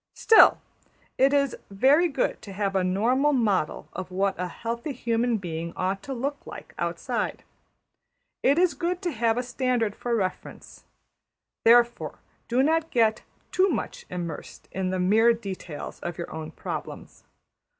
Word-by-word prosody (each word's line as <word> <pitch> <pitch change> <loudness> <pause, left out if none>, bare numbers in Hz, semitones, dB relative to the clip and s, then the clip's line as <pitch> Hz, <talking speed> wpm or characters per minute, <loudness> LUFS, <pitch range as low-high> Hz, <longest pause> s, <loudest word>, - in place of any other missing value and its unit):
Still, 445 - +7 0.6
it 270 +1 +5
is 280 -3 +2
very 270 - +4
good 270 -5 -1
to 200 - -9
have 195 0 -1
a 190 - +2
normal 245 +11 +2
model 205 - 0
of 185 0 -6
what 195 +1 0
a 180 - -1
healthy 235 - -4
human 235 -1 0
being 170 -3 -5
ought 190 +1 -1
to 270 - -6
look 280 +4 -2
like - - -10
outside. - - -2 1.0
It 280 +3 +3
is 360 0 +4
good 360 +2 -2
to 350 - 0
have 230 -3 +1
a 250 - 0
standard 245 -4 -1
for 240 -1 -2
reference. 185 -4 -5 0.8
Therefore 235 +1 +4 0.3
do 250 +3 +2
not 320 +2 +1
get 225 -2 +2 0.3
too 380 +1 +3
much - - -4
immersed 170 -4 -6
in 190 -1 -2
the 185 - -1
mere 220 +6 +4
details 190 -8 -7
of 175 - -5
your 170 - -6
own 160 -1 -6
problems. - - -7
230 Hz, 150 wpm, -26 LUFS, 190-265 Hz, 1.0 s, Still